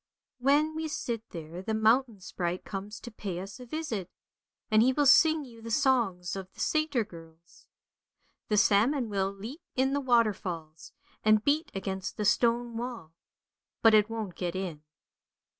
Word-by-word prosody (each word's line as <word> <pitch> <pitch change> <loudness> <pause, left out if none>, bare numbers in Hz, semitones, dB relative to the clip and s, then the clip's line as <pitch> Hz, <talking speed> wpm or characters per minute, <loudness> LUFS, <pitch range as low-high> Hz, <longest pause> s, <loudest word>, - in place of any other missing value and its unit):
When 290 +4 +3
we 315 0 -3
sit 235 -6 -4
there 165 +1 -7
the 220 +3 -2
mountain 220 -1 +2
sprite 180 -1 -3
comes 205 +2 -6
to 240 - -9
pay 195 -5 -5
us 195 +5 -8
a 250 - -10
visit, 235 - -4 0.6
and 215 0 +6
he 255 +3 +5
will 290 +2 +2
sing 310 +3 +6
you 230 -3 -14
the 230 - -7
songs 225 - +1
of 190 -1 -7
the - - -18
Salter 310 -6 +1
girls. 165 -3 -16 0.8
The 210 - +2
salmon 225 +5 +3
will 195 -1 0
leap 220 - -9
in 265 +1 +2
the 285 - 0
waterfalls, 190 - 0 0.3
and 215 0 +4
beat 305 +4 +2
against 190 -1 -4
the 210 - -1
stone 235 +2 +2
wall, 235 -9 -6 0.7
but 225 -1 +7
it 210 0 +5
won't 220 -5 -4
get 175 0 -4
in. 180 -5 -4
220 Hz, 160 wpm, -29 LUFS, 190-255 Hz, 0.8 s, but